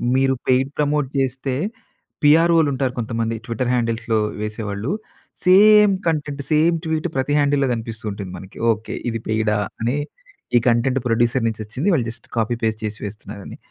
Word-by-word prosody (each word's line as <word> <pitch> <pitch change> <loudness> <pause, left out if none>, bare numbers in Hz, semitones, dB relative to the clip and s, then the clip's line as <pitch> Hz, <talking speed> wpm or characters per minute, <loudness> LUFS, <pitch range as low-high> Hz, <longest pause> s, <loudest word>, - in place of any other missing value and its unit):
మీరు 135 0 +3
paid 130 +1 +3
promote 150 -1 +1
చేస్తే 135 0 -1 0.7
పిఆర్‌ఓలు 165 +1 +5
ఉంటారు 130 -1 -1
కొంతమంది. 115 0 -2
ట్విట్టర్ 120 +1 -2
హ్యాండిల్స్‌లో 115 -2 0 0.2
వేసేవాళ్ళు. 105 - -3 0.5
సేమ్ 210 +2 +7 0.2
కంటెంట్, 150 -3 -1
సేమ్ 160 +3 +4
ట్వీట్ 160 +1 -1
ప్రతి 135 +2 0
హ్యాండిల్‌లో 145 -1 +2
కనిపిస్తూ 115 -1 -5
ఉంటుంది 100 -2 -6
మనకి. 95 +2 -12
"ఓకె 110 0 -4
ఇది 115 -1 -3
పెయిడా?" 110 -1 +1 0.2
అని 120 +5 0 0.6
ఈ - - +6
కంటెంట్ 125 +2 +2
ప్రొడ్యూసర్ 120 +1 +2
నుంచి 110 -1 -3
వచ్చింది 130 - -4
వాళ్ళు 130 -8 +1
జస్ట్ 115 - -10
కాపీ 115 +2 +1 0.3
చేసి 105 0 -4
వేస్తున్నారని. 100 0 -8
125 Hz, 145 wpm, -21 LUFS, 110-145 Hz, 0.7 s, సేమ్